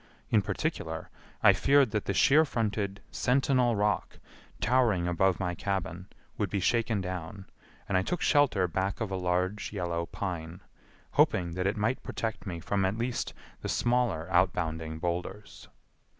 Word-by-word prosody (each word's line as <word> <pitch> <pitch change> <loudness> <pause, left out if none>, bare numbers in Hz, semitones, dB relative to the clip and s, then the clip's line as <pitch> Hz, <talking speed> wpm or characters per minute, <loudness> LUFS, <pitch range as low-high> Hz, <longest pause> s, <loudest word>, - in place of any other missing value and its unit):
In 110 - +5
particular, - - -3 0.3
I - - +8
feared 140 -4 +4
that 105 -1 -1
the 95 - -1
sheer 150 - +6
fronted 105 -7 -2
Sentinel 125 -2 +2
Rock, 105 0 0 0.4
towering 110 -6 +2
above 90 +1 +2
my 90 -2 -1
cabin, 95 -1 -3 0.3
would 105 -3 0
be 100 - -1
shaken 115 +1 +1
down, 90 +1 -6 0.4
and 100 - -1
I 95 - +4
took 175 - -2
shelter 130 - +3
back 95 +3 -2
of 110 -4 -3
a - - -1
large 90 +2 -1
yellow 85 -4 -2
pine, 90 -2 -5 0.5
hoping 85 -2 +3
that 90 +2 -1
it 105 +2 -1
might 110 +5 0
protect 110 -1 -4
me 85 -3 -4
from 100 +4 -1
at 95 +3 0
least 120 +1 -2 0.3
the - - -4
smaller 120 -9 +1
outbounding 80 -3 +1
boulders. 90 +4 -4
95 Hz, 150 wpm, -29 LUFS, 90-110 Hz, 0.5 s, I